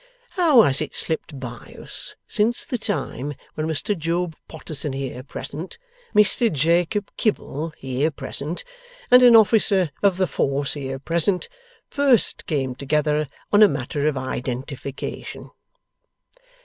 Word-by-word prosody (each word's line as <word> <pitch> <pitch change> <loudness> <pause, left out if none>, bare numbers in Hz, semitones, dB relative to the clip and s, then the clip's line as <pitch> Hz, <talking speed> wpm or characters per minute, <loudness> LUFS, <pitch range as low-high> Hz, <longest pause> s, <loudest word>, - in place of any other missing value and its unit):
How 315 - +5
has 135 0 +2
it 155 - -4
slipped 160 -3 -2
by 120 -2 -9
us, - - -4
since 225 +3 0
the 245 - -3
time 145 - -2 0.2
when 155 0 -3
Mr 160 +6 -1
Job 170 0 -2
Potterson 150 -3 -3
here 135 -2 -5
present, 150 +5 -7 0.4
Mr 210 +2 +4
Jacob 170 +7 +1
Kibble 165 -7 -1
here 135 +3 -1
present, 155 +2 -5 0.5
and 250 0 +9
an 245 -2 +8
Officer 205 -6 +5
of 195 -3 +3
the 190 - +2
Force 140 -4 -1
here 135 -2 -4
present, 170 +6 0 0.4
first 275 -6 +2
came 135 -5 -1
together 150 +3 0 0.3
on 205 - +6
a 210 - +10
matter 140 0 -2
of 150 -3 0
Identification! 130 +1 -5
155 Hz, 130 wpm, -22 LUFS, 140-200 Hz, 0.5 s, a